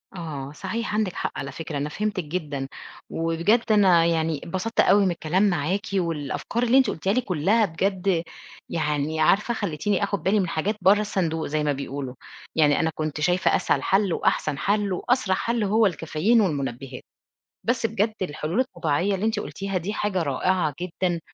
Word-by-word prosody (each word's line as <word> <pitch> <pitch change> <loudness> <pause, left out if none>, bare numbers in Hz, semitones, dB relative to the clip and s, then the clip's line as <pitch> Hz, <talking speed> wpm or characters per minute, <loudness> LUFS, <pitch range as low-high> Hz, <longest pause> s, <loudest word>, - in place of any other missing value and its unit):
آه 145 -6 -6
صحيح 225 +9 -4
عندِك 210 -4 0
حق - - -3
على 140 0 -5
فكرة 155 +1 -5
أنا 145 +2 -2
فهمتِك 210 +2 -2
جدًا، 145 -4 -4 0.4
وبجد 170 +9 +1
أنا 185 -6 +5
يعني 160 -3 0
انبسطت 190 +7 -3
أوي 200 0 +5
من 185 - +2
الكلام 170 +3 0
معاكِ 175 +3 0
والأفكار 170 - -1
اللي 245 +2 +4
أنتِ 265 - +4
قُُلتيها 190 +5 -1
لي 255 - +2
كلّها 205 +2 +2
بجد 185 0 0 0.5
يعني 150 -1 -1
عارفة 205 +9 +3
خلّيتيني 205 0 -1
آخُد 200 0 -2
بالي 205 +3 +3
من 185 - 0
حاجات 185 +7 -1
برّه 200 +2 +5
الصندوق 170 -6 -1
زي 155 +1 -1
ما 150 - +1
بيقولوا، 135 -1 -5 0.4
يعني 150 -2 +4
أنا 160 - +2
كنت 155 -1 -3
شايفة 180 +4 +2
أسهل - - +1
حَل 195 -2 +2
وأحسن 155 -2 0
حَل 200 +3 0
وأسرع 220 0 +1
حَل 230 +3 -1
هو 210 +1 +3
الcaffeine 175 +7 +1
والمنبهات، 135 - -3 0.6
بس 240 0 0
بجد 220 0 0
الحلول 160 +3 -2
الطبيعية 175 - 0
اللي 190 +3 -2
أنتِ 220 -1 0
قُلتيها 195 -2 -4
دي 185 +4 -3
حاجة 205 -4 -1
رائعة 155 +3 0
جدًا، 175 0 -1
180 Hz, 170 wpm, -24 LUFS, 155-205 Hz, 0.6 s, أنا